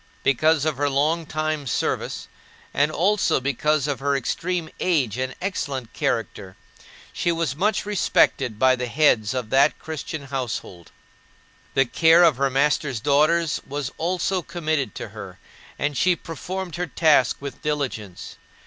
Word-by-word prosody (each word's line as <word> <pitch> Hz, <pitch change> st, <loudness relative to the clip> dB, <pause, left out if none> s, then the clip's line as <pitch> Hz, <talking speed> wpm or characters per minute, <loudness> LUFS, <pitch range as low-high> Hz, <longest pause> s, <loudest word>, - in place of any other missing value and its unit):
Because 155 Hz, +3 st, +3 dB
of 155 Hz, -4 st, -1 dB
her 145 Hz, +1 st, +1 dB
long 155 Hz, +4 st, 0 dB
time 155 Hz, -2 st, -2 dB
service -, -, -2 dB, 0.5 s
and 145 Hz, +2 st, +2 dB
also 195 Hz, +3 st, +2 dB
because 140 Hz, +2 st, 0 dB
of 140 Hz, -2 st, -2 dB
her 140 Hz, +1 st, 0 dB
extreme 165 Hz, +5 st, -2 dB
age 140 Hz, -, +1 dB
and 130 Hz, 0 st, -3 dB
excellent 140 Hz, -, -4 dB
character, 100 Hz, -4 st, -3 dB, 0.6 s
she 175 Hz, -, 0 dB
was 165 Hz, -4 st, -1 dB
much 205 Hz, +7 st, 0 dB
respected 135 Hz, -, +1 dB
by 130 Hz, +2 st, +4 dB
the 125 Hz, 0 st, -4 dB
heads 120 Hz, -5 st, +2 dB
of 125 Hz, -4 st, -4 dB
that 140 Hz, +3 st, +4 dB
Christian 160 Hz, -1 st, -6 dB
household. 125 Hz, -10 st, -5 dB, 0.8 s
The 135 Hz, -, +4 dB
care 165 Hz, +6 st, +5 dB
of 160 Hz, -7 st, +4 dB
her 140 Hz, 0 st, +1 dB
master's 140 Hz, -1 st, +1 dB
daughters 150 Hz, +5 st, +2 dB
was 140 Hz, -1 st, -4 dB
also 180 Hz, +2 st, 0 dB
committed 155 Hz, -, -2 dB
to -, -, -6 dB
her, -, -, -10 dB, 0.4 s
and 145 Hz, 0 st, -1 dB
she 180 Hz, +6 st, +3 dB
performed 175 Hz, +2 st, -6 dB
her 180 Hz, 0 st, -2 dB
task 150 Hz, -5 st, +3 dB
with 140 Hz, -2 st, -8 dB
diligence. 130 Hz, -11 st, -4 dB
145 Hz, 145 wpm, -23 LUFS, 130-165 Hz, 0.8 s, care